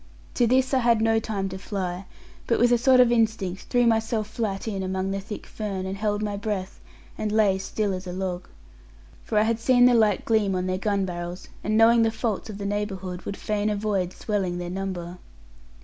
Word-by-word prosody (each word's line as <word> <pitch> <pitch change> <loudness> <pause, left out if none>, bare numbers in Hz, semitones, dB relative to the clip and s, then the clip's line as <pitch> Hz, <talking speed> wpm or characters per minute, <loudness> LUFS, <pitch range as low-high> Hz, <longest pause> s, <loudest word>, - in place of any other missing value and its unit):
To 240 - +2
this 260 +2 +2
I 265 - +4
had 235 -2 +3
no 225 0 +3
time 200 -3 -3
to 190 0 -7
fly, 190 -2 -4 0.4
but 235 - +2
with 240 +1 +4
a 240 - +5
sort 255 +1 +5
of 245 -1 +6
instinct, 220 -5 0
threw 245 -1 +3
myself 225 -1 +1
flat 215 -2 -3
in 200 -3 -2
among 190 0 -2
the 195 - -2
thick 210 +2 -8
fern, 195 -3 -4
and 190 +1 -3
held 205 +1 -1
my 205 -1 -2
breath, 200 -2 -4 0.4
and 215 -1 -1
lay 210 -3 +3
still 205 +1 -2
as 185 0 -6
a - - -4
log. 185 -1 -4 0.8
For 215 - -2
I 210 - +5
had 225 +1 0
seen 245 +1 +5
the 250 - +6
light 215 -4 +3
gleam 210 -4 +2
on 180 0 -1
their 185 0 -1
gun 200 -1 0
barrels, 175 0 -6
and 215 +2 +1
knowing 230 +1 +6
the 225 - +4
faults 220 -1 -3
of 205 - -6
the 200 - -5
neighbourhood, 195 -3 -3
would 200 - -4
fain 210 0 -1
avoid 200 -3 -1
swelling 190 -4 -2
their 175 0 -5
number. 180 -2 -5
205 Hz, 210 wpm, -25 LUFS, 190-225 Hz, 0.8 s, of